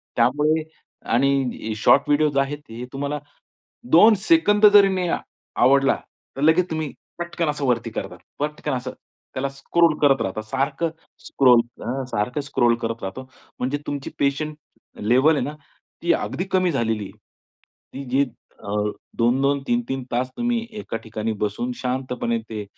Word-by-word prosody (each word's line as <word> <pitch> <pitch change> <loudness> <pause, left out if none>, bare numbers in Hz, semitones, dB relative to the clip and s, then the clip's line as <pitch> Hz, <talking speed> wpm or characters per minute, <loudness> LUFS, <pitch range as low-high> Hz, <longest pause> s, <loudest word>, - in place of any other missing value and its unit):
त्यामुळे 150 +6 +2 0.5
आणि 130 -3 +1
short 140 +6 +5
video 150 +1 +3
आहेत, 140 +2 -1
हे 115 +2 -7
तुम्हाला 140 +2 -3 0.7
2 215 +7 +8
सेकंद 215 -7 +5
जरी 200 -1 +8
नाही 185 -2 -1
अ - - +1 0.5
आवडला, 135 +2 +5 0.4
तर 135 - -4
लगेच 165 +3 +4
तुम्ही 155 -3 -3 0.3
पटकन 170 -1 -2
असं 150 -1 -2
वरती 115 -2 0
करता, - - -5 0.2
पटकन 150 0 -3
असं 130 0 -3 0.4
त्याला 135 +1 -1
स्क्रोल 155 +4 +2
करत 135 -2 +4
राहता, 100 +3 -3
सारखं 140 +8 -1 0.3
स्क्रोल, 125 -3 +5 0.2
अ, 130 +3 -2
सारखं 125 +7 -1
स्क्रोल 120 -4 +2
करत 115 0 -3
राहतो. 130 +7 -6 0.3
म्हणजे 130 +3 -1
तुमची 140 -1 -4
पेशंन्स 150 +2 0 0.4
लेव्हल 130 +9 +4
आहे - - 0
ना, 145 - -5 0.5
ती 170 0 +3
अगदी 180 - -2
कमी 185 -2 +2
झालेली 115 -5 -1
आहे. - - -12 0.8
ती 140 - -6
जी 135 +2 +3 0.4
अ, - - -8 0.5
2-2, 135 +4 +2
3-3 240 - -1
तास 125 +2 0
तुम्ही 240 0 0 0.2
एका 205 - -5
ठिकाणी 110 0 -4
बसून 105 +4 -2
शांतपणे 125 -2 -2
ते 105 -2 -4
140 Hz, 150 wpm, -23 LUFS, 120-155 Hz, 0.8 s, 2